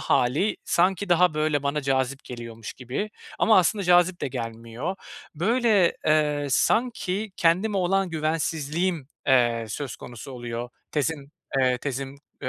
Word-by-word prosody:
hâli 145 +13 +2
sanki 185 +3 +1
daha, 175 -1 +4
böyle, 155 -2 +1
bana 145 +1 -1
cazip 135 0 0
geliyormuş 115 -3 -8
gibi. 130 - -4 0.3
Ama 220 -3 +5
aslında 195 +3 +2
cazip 175 0 +4
de - - -1
gelmiyor. 115 +9 -5 0.4
Böyle, 210 +1 +3
eee, 150 -2 +2
sanki 210 - +1
kendime 185 +5 +2
olan 190 0 +1
güvensizliğim, 160 0 -1 0.2
eee, 120 -4 +3
söz 130 +4 -5
konusu 120 +3 -9
oluyor, 120 -1 -5 0.2
tezin, 145 -1 -2 0.3
eee, 125 -1 +2
tezim 135 0 -4 0.3
eee, - - -1
150 Hz, 130 wpm, -25 LUFS, 130-180 Hz, 0.4 s, Ama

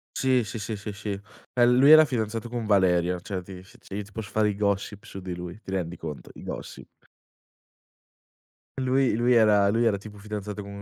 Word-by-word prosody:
Sì, 130 -2 +2
sì, 110 - -6
sì, 110 +2 -4
sì, 105 -1 -5 0.3
eh 120 -1 +4
lui 125 +3 +5
era 155 0 +10
fidanzato 115 -4 -2
con 120 -2 -4
Valeria 90 -3 +3
cioè 95 +1 -5
ti 90 0 -11
si 115 +6 -18 0.2
io 105 - -3
ti 100 - -17
posso 110 -2 -6
fare 110 +1 +2
i 100 - -2
gossip 100 0 -1
su 95 - -8
di 90 -1 -5
lui, 90 +2 -8
ti 95 - -9
rendi 90 -2 -3
conto 75 -3 -7
i - - -11
gossip. - - -9 1.8
Lui 130 -2 +2
lui 120 +2 +3
era 105 -3 +5
lui 115 +3 +2
era 105 -3 +2
tipo 105 +1 -11
fidanzato 105 0 -6
co - - -11
105 Hz, 195 wpm, -26 LUFS, 95-115 Hz, 1.8 s, era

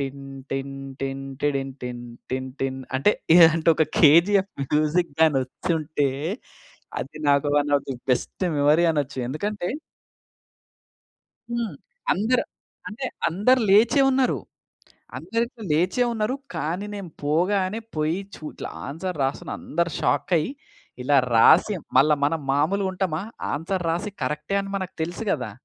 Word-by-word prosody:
టిన్ 140 0 -5 0.3
టిన్ 135 0 -3 0.3
టిన్ 135 0 -3 0.2
టిడిన్‌టిన్ 135 -4 -3 0.3
టిన్ 130 0 -2
టిన్ 135 0 -2 0.2
అంటే 140 +10 +4 0.2
ఇలాంటి 165 -1 +6
ఒక 160 - +3
'కేజీఎఫ్' 190 +6 +5 0.2
మ్యూజిక్ 155 +2 +2
గాని 155 -4 +5
వచ్చుంటే 150 +1 -1 0.9
అది 155 +3 -8
నాకు 140 +1 +3
one 145 0 +2
of 140 - -3
the - - -2 0.2
best 125 +8 -1
memory 150 +4 +4
అనొచ్చు. 140 -3 -2
ఎందుకంటే 200 +5 -3 1.8
హ్మ్. 235 -7 -2 0.4
అందరు 225 +6 +1 0.4
అంటే 240 +5 -5 0.2
అందరూ 210 +10 +3
లేచే 225 +8 +5
ఉన్నారు. 260 -1 +2 0.8
అందరు 230 0 -1
ఇట్లా 230 -3 -12
లేచే 180 +10 +2
ఉన్నారు. 220 +3 -1 0.2
కానీ 170 +6 -2
నేను 195 -5 -7
పోగానే 185 +7 +1 0.2
పోయి 155 +4 0 0.2
చు - - -14
ఇట్లా - - -7 0.2
ఆన్సర్ 165 +3 -4
రాస్తున్నా 135 +1 -2
అందరు 170 +1 -1
షాక్ 190 - 0
అయ్యి 155 +9 0 0.5
ఇలా 145 +3 +3 0.2
రాసి 175 - +6 0.2
మళ్ళా 150 +3 +6
మనం 160 +2 0
మామూలుగా 190 +7 +1
ఉంటామా. 180 -4 -1 0.3
ఆన్సర్ 170 +5 -2
రాసి 175 +5 -2
కరెక్టే 150 +5 -2
అని 195 0 -6
మనకు 185 -1 -5
తెలుసు 175 +6 -4
గదా! 130 -5 -1
160 Hz, 130 wpm, -24 LUFS, 145-195 Hz, 1.8 s, ఇలాంటి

